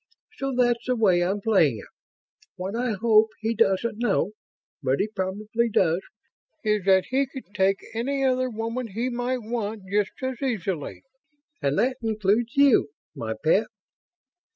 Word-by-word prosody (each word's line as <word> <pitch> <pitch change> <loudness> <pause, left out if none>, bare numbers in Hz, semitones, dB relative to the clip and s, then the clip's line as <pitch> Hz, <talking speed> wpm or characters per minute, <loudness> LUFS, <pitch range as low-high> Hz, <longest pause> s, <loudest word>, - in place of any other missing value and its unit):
So 275 0 -2
that's 240 -1 +1
the 250 - +2
way 190 -6 +3
I'm 195 +3 -1
playing 185 - +3
it. 100 - -10 0.7
What 185 +3 -4
I 245 -1 0
hope 220 +1 +4
he 225 +1 -1
doesn't 210 +2 +1
know... 210 -4 +1 0.5
but 135 -1 +1
he 205 - +1
probably 215 +3 -2
does... 175 -4 +2 0.6
is 210 -3 +1
that 190 -1 +4
he 270 +1 +2
could 260 -6 -11
take 195 -1 +1
any 270 +4 -1
other 255 0 +1
woman 230 +2 -3
he 230 +5 -2
might 245 0 -2
want, 220 -2 -3
just 205 0 +1
as 260 0 -3
easily. 195 - -3 0.6
And 140 +1 0
that 255 +1 +1
includes 220 +3 0
you, 280 - +5 0.3
my 110 -1 -4
pet." 200 +8 +3
220 Hz, 155 wpm, -25 LUFS, 195-245 Hz, 0.7 s, you